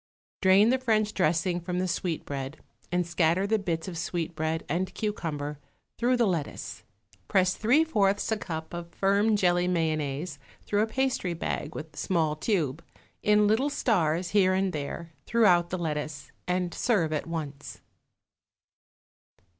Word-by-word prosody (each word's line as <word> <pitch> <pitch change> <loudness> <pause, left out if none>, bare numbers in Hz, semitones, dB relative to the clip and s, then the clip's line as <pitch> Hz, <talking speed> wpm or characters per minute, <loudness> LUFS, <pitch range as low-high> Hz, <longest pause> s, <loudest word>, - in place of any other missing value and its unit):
Drain 195 +3 +6
the 260 - +2
French 215 -4 +1
dressing 175 +1 +1
from 180 +1 -3
the 185 +1 0
sweetbread 145 -5 -3 0.3
and 180 0 +1
scatter 170 +2 +2
the 220 +1 +2
bits 170 -3 -2
of 170 -3 -5
sweetbread 160 -2 -2
and 180 +4 -1
cucumber 150 -9 -3 0.4
through 250 +1 +3
the 240 - +3
lettuce. 170 -7 -3 0.5
Press 185 -1 +3
three 250 +9 +4
fourths 205 -10 +1
a 220 - +2
cup 160 -5 -6
of 170 0 -7
firm 200 +3 +3
jelly 180 -2 +2
mayonnaise 155 -2 -1 0.2
through 205 0 +1
a 220 - +2
pastry 260 -8 -1
bag 155 -2 -3
with 155 0 -7
small 160 -5 0
tube, 155 - -1 0.4
in 210 0 +4
little 225 +7 +2
stars, 175 - +1
here 185 -2 +4
and 190 0 0
there, 160 +3 -5
throughout 180 -7 +4
the 185 - -2
lettuce, 150 -3 -4 0.2
and 180 -1 0
serve 180 -10 +1
at 155 - -2
once. 150 -4 -6
180 Hz, 145 wpm, -28 LUFS, 160-205 Hz, 0.5 s, Drain